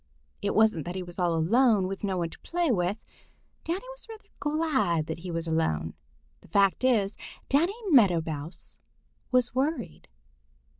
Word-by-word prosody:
It 200 Hz, -, -1 dB
wasn't 215 Hz, -8 st, +4 dB
that 175 Hz, -, -5 dB
he 185 Hz, -, -3 dB
was 175 Hz, 0 st, -10 dB
all 175 Hz, -2 st, +2 dB
alone 210 Hz, +5 st, +3 dB
with 195 Hz, +2 st, -5 dB
no 195 Hz, -2 st, -1 dB
one 170 Hz, -2 st, -2 dB
to -, -, -12 dB
play 345 Hz, -4 st, 0 dB
with. 185 Hz, -1 st, 0 dB, 0.7 s
Danny 360 Hz, +8 st, -3 dB
was -, -, -9 dB
rather 440 Hz, -1 st, -12 dB
glad 275 Hz, -, +1 dB
that 160 Hz, +1 st, -5 dB
he 180 Hz, +2 st, -7 dB
was 165 Hz, -1 st, -2 dB
alone. 80 Hz, -, 0 dB, 0.5 s
The -, -, -19 dB
fact 195 Hz, +6 st, +2 dB
is, 215 Hz, -6 st, +2 dB, 0.3 s
Danny 335 Hz, +9 st, +2 dB, 0.2 s
Meadow 195 Hz, -, +5 dB
Mouse 155 Hz, +2 st, -7 dB, 0.5 s
was 250 Hz, -1 st, +2 dB
worried. 260 Hz, -, -2 dB
195 Hz, 160 wpm, -28 LUFS, 170-260 Hz, 0.7 s, Meadow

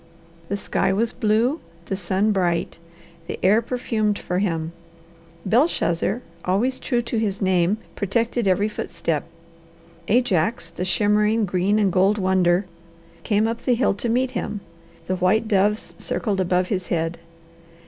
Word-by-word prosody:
The 200 Hz, -, -1 dB
sky 195 Hz, -, 0 dB
was 225 Hz, +4 st, 0 dB
blue, 235 Hz, +6 st, +1 dB, 0.3 s
the 195 Hz, -, -2 dB
sun 190 Hz, +3 st, 0 dB
bright, 175 Hz, -4 st, 0 dB, 0.5 s
the -, -, -4 dB
air 210 Hz, +4 st, +5 dB
perfumed 225 Hz, -4 st, -1 dB
for 180 Hz, +1 st, -2 dB
him; 165 Hz, -5 st, -1 dB, 0.7 s
Belshazzar, 220 Hz, -, +1 dB, 0.2 s
always 230 Hz, +8 st, 0 dB
true 240 Hz, -2 st, 0 dB
to 230 Hz, -1 st, -2 dB
his 200 Hz, -3 st, -1 dB
name, 185 Hz, 0 st, +2 dB, 0.2 s
protected 230 Hz, +2 st, 0 dB
every 195 Hz, +3 st, +3 dB
footstep; 165 Hz, -7 st, -3 dB, 0.8 s
Ajax, 225 Hz, -3 st, +1 dB
the 180 Hz, -, -4 dB
shimmering 210 Hz, +3 st, +2 dB
green 190 Hz, +3 st, +1 dB
and 205 Hz, -3 st, +2 dB
gold 195 Hz, +3 st, +3 dB
wonder, 185 Hz, -1 st, +2 dB, 0.6 s
came 215 Hz, 0 st, +1 dB
up 230 Hz, +1 st, -3 dB
the 250 Hz, -, +2 dB
hill 245 Hz, -2 st, +2 dB
to 215 Hz, +4 st, -3 dB
meet 255 Hz, +2 st, +1 dB
him; 210 Hz, -5 st, -4 dB, 0.4 s
the 185 Hz, -, -1 dB
white 200 Hz, +5 st, +2 dB
doves 210 Hz, 0 st, +1 dB
circled 205 Hz, -4 st, -2 dB
above 180 Hz, 0 st, +1 dB
his 185 Hz, -4 st, -2 dB
head. 165 Hz, 0 st, -1 dB
205 Hz, 140 wpm, -23 LUFS, 185-225 Hz, 0.8 s, air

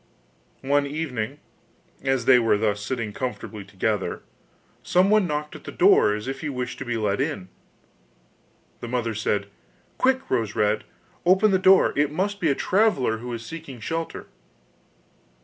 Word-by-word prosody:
One 140 Hz, +1 st, +2 dB
evening, 140 Hz, -4 st, -3 dB, 0.6 s
as 135 Hz, -3 st, 0 dB
they 125 Hz, -1 st, +7 dB
were 110 Hz, -3 st, +3 dB
thus 105 Hz, -1 st, -1 dB
sitting 115 Hz, -3 st, -3 dB
comfortably 115 Hz, -4 st, -5 dB
together, 100 Hz, +1 st, -2 dB, 0.6 s
someone 195 Hz, +2 st, +3 dB
knocked 150 Hz, -1 st, -3 dB
at -, -, -11 dB
the -, -, -7 dB
door 105 Hz, -, +4 dB
as 105 Hz, +3 st, -6 dB
if 135 Hz, 0 st, -4 dB
he 155 Hz, -, -3 dB
wished 125 Hz, -2 st, -4 dB
to 135 Hz, -, -5 dB
be 120 Hz, -1 st, -2 dB
let 105 Hz, -2 st, 0 dB
in. 95 Hz, -2 st, -3 dB, 1.3 s
The 120 Hz, -, -6 dB
mother 115 Hz, -2 st, -1 dB
said: 105 Hz, -1 st, -1 dB, 0.5 s
'Quick, 260 Hz, 0 st, +2 dB
Rose 115 Hz, -4 st, -1 dB
red, 105 Hz, 0 st, +1 dB, 0.4 s
open 190 Hz, +4 st, +4 dB
the 190 Hz, -, +3 dB
door, 190 Hz, 0 st, +5 dB
it 145 Hz, 0 st, +2 dB
must 200 Hz, +5 st, -2 dB
be 165 Hz, -, +1 dB
a 140 Hz, -, +2 dB
traveller 180 Hz, -, +1 dB
who 120 Hz, +1 st, -6 dB
is 115 Hz, -1 st, -6 dB
seeking 155 Hz, -5 st, -8 dB
shelter. 165 Hz, +8 st, -4 dB
130 Hz, 155 wpm, -24 LUFS, 110-165 Hz, 1.3 s, they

